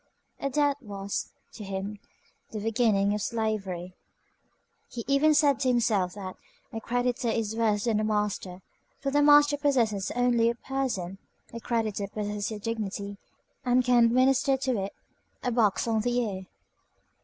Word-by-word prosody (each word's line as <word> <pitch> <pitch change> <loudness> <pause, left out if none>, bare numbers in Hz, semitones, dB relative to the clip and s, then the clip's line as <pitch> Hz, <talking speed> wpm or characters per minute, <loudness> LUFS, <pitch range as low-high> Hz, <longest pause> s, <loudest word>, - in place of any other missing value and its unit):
A 275 - -1
debt 285 0 +2
was, 200 -3 -4 0.2
to 215 - -8
him, 195 +1 -5 0.5
the 215 - -5
beginning 210 -2 +2
of 210 - -2
slavery. 200 -6 -2 1.0
He 235 -2 -6
even 290 +3 +4
said 285 -3 +4
to 270 - 0
himself, 220 -7 +1
that 190 -2 -7 0.4
a 225 - -4
creditor 245 0 -1
is 220 -1 -1
worse 215 -3 +1
than 225 -3 +1
a - - 0
master; 210 -4 -2 0.4
for 275 0 -2
the 290 +1 +3
master 290 0 +6
possesses 235 -9 +1
only 245 -2 +3
your 235 - +1
person, 235 -9 -3 0.3
a 230 - -5
creditor 220 -4 -1
possesses 205 0 -3
your 215 -2 -5
dignity 205 -2 -4 0.4
and 250 0 +2
can 245 -2 +5
administer 265 +3 +3
to 260 -1 -1
it 195 - -8 0.5
a 250 - 0
box 225 -2 +2
on 220 -1 +1
the 245 +2 0
ear. 195 -6 -2
225 Hz, 155 wpm, -27 LUFS, 205-250 Hz, 1.0 s, master